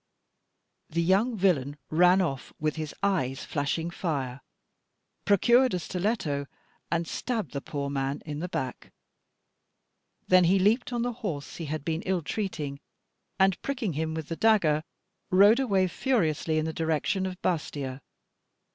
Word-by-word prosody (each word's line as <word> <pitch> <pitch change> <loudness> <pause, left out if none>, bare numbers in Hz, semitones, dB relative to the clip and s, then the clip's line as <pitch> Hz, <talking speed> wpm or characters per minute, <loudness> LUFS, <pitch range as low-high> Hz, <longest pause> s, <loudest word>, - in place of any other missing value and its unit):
The 170 +1 0
young 205 +7 +2
villain 150 -7 +1
ran 180 +4 +5
off, 135 -7 -3
with 155 -1 0
his 155 -2 -4
eyes 135 -10 0
flashing 160 +3 -2
fire, 135 -8 -3 0.8
procured 240 +4 +4
a - - -1
stiletto, 175 -7 -2 0.4
and 170 0 0
stabbed 220 - -3
the 140 - -4
poor 140 -1 -4
man 140 0 -2
in 150 -1 -5
the 180 +3 -4
back. 130 -7 -4 1.4
Then 185 -1 +6
he 185 +3 +4
leaped 220 +7 +2
on 240 -1 -1
the 245 0 -1
horse 155 -10 -4
he 165 - -5
had 155 0 -4
been 165 0 -1
ill 185 -3 0
treating, 150 -7 -3 0.6
and 190 -2 +3
pricking 245 - -2
him 160 +2 -2
with 160 -2 -5
the 165 - -2
dagger, 175 -8 +3 0.5
rode 205 +5 +6
away 195 -8 +2
furiously 165 - 0
in 155 - +1
the 160 - -3
direction 165 +4 0
of 185 -1 -7
Bastia. 140 -5 -2
170 Hz, 145 wpm, -28 LUFS, 150-195 Hz, 1.4 s, Then